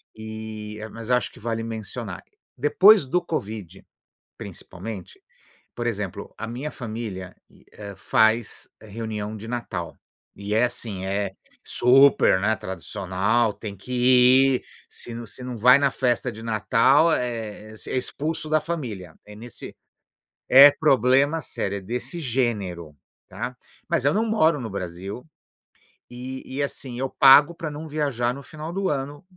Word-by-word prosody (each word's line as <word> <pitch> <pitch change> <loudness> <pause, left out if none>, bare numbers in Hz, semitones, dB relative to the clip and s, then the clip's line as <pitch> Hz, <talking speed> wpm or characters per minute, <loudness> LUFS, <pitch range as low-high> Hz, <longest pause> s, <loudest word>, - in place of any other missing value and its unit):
E 110 -1 -7
mas 115 +1 -6
acho 125 -3 +1
que - - -16
vale 115 +1 -3
mencionar. 110 -3 -6 0.3
Depois 190 +4 +6
do 180 +7 0
covid, 105 - -6 0.5
principalmente, 95 0 -9 0.5
por 120 - -4
exemplo, 100 -3 -4
a 115 - -5
minha 125 +6 -5
família, 110 -6 -6 0.4
eh, 100 -1 -9
faz 110 +3 +1
reunião 110 0 -5
de 110 +1 -9
Natal, 95 -9 -5 0.4
e 100 +1 -6
é 115 +3 +4
assim, 115 -6 -3
é 100 0 -1 0.3
super, 125 -6 +5
né, 110 +2 +1
tradicional, 100 +4 -1
tem 100 0 -8
que 125 +7 -10 0.6
ir, - - -9 0.2
se 120 - -10
não 120 0 -6
se 125 - -11
não 125 -1 -5
vai 125 +4 +7
na 140 -1 +2
festa 125 -1 0
de 110 0 -10
Natal, 125 +8 +3
é 110 -5 -3 0.2
expulso 155 +5 -1
da 155 0 +3
família. 120 - -5
É 105 0 -12
nesse 115 +1 -9 0.7
é 140 +3 +10
problema 140 +1 +3
sério, 100 -6 -4
é - - -9
desse 125 - -5
gênero, 105 - -2 0.3
está? 120 +2 -6 0.3
Mas - - 0
eu 140 - +3
não 220 +2 +2
moro 165 -9 +2
no 115 -3 -5
Brasil 95 +4 -6 0.9
e 130 +2 -7
e 135 +2 -3
assim 130 -3 -5
eu 135 0 -1
pago 145 +4 +7
para 165 -1 -5
não 150 +2 -7
viajar 140 -6 -1
no 140 - -9
final 155 +3 -8
do 195 0 -1
ano 145 0 -4
115 Hz, 145 wpm, -24 LUFS, 105-135 Hz, 0.9 s, é